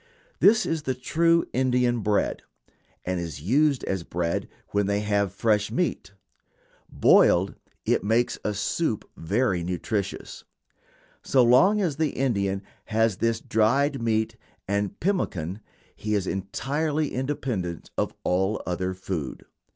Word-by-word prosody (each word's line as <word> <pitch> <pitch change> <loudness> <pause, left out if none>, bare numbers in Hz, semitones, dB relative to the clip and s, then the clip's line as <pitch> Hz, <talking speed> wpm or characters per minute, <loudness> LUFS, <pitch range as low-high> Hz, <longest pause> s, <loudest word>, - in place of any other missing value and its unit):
This 220 +2 +5
is 165 -1 -1
the 130 -3 -2
true 165 +6 +2
Indian 125 -2 +2
bread, 105 -1 0 0.6
and 90 0 -1
is 80 -5 -5
used 135 - +2
as 95 -2 -2
bread 85 0 -2 0.2
when 100 -1 +1
they 100 0 +1
have 100 -2 +1
fresh 105 +1 +1
meat. 175 - -2 0.8
Boiled, 95 +3 +4 0.3
it - - +1
makes 115 +4 +1
a 105 - -1
soup 110 +4 -1
very 100 +1 0
nutritious. 95 +3 -3 0.8
So 130 -2 +3
long 185 - +5
as 160 -7 -1
the 155 -3 0
Indian 100 -7 0 0.2
has 110 -3 +1
this 115 -1 +1
dried 135 +6 +1
meat 110 -1 0 0.3
and 100 0 -1
pemmican 105 - -1 0.3
he 105 0 -2
is 100 -2 0
entirely 145 +11 -2
independent 125 - -3
of - - 0
all 95 +4 +1
other 90 +1 -2
food. 90 -7 -5
110 Hz, 130 wpm, -26 LUFS, 95-135 Hz, 0.8 s, This